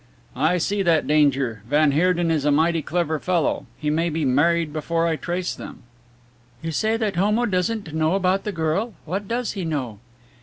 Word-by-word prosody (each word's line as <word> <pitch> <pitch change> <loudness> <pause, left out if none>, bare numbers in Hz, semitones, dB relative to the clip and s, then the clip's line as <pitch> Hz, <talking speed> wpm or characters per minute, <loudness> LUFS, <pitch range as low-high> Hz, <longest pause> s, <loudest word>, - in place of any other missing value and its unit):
"I 155 +7 +2
see 200 +4 0
that 170 -4 +2
danger 140 -7 +2
van 150 0 +4
Heerden 175 +2 +2
is 155 -3 0
a 150 - +2
mighty 160 +3 +2
clever 160 -1 -1
fellow. 175 -2 0
He 150 -1 -1
may 165 +3 +1
be 160 -1 -1
married 155 +4 +2
before 165 +2 -1
I 165 -1 +1
trace 175 +5 -3
them." - - -10 0.8
"You 165 - -2
say 220 +7 +1
that 210 -5 -2
Homo 210 +6 +2
doesn't 190 -2 -1
know 160 +3 +1
about 190 0 +1
the 210 - -3
girl, 170 +6 -1
what 195 +5 -3
does 240 +2 -2
he 195 -3 -5
know?" 135 -10 -3
165 Hz, 185 wpm, -23 LUFS, 155-185 Hz, 0.8 s, van